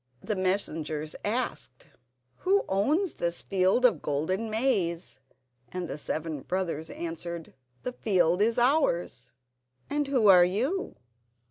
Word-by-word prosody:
The 215 - -1
messengers 160 -5 -1
asked: 210 - -3 0.5
"Who 395 +2 +2
owns 295 - +1
this 170 0 -2
field 195 +6 +2
of 240 - +4
golden 185 +10 -1
maize?" 210 -7 0 0.5
And 180 -1 -4
the - - -4
seven 155 -1 -3
brothers 170 -3 -3
answered: 170 0 -6 0.3
"The 250 - -3
field 180 -5 +2
is 230 +3 +2
ours." 240 - +1 0.6
"And 290 -1 0
who 260 -5 +2
are 180 -3 +9
you?" 250 - -1
185 Hz, 120 wpm, -28 LUFS, 170-240 Hz, 0.6 s, are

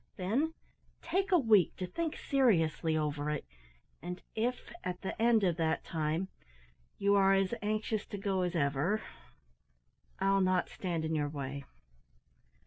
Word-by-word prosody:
Then 260 - 0 0.5
take 380 +4 0
a 360 - +7
week 220 - +4
to 185 - -2
think 320 - -3
seriously 165 - +2
over 150 -1 -1
it; 150 -1 -2 0.6
and 180 +3 -5
if 240 +2 -2
at 180 +1 -4
the 195 - -4
end 230 -2 +4
of 175 -3 +2
that 160 -1 0
time, 160 +3 -1 0.7
you 200 0 +3
are 195 -1 +5
as 195 +2 +1
anxious 215 0 -1
to 205 - -5
go 195 -1 0
as 180 -1 -1
ever, 150 +8 +1 1.1
I'll 195 0 +3
not 185 -1 +2
stand 170 -3 -3
in 160 - -1
your 145 -2 0
way." 140 -1 -5
185 Hz, 145 wpm, -32 LUFS, 160-215 Hz, 1.1 s, a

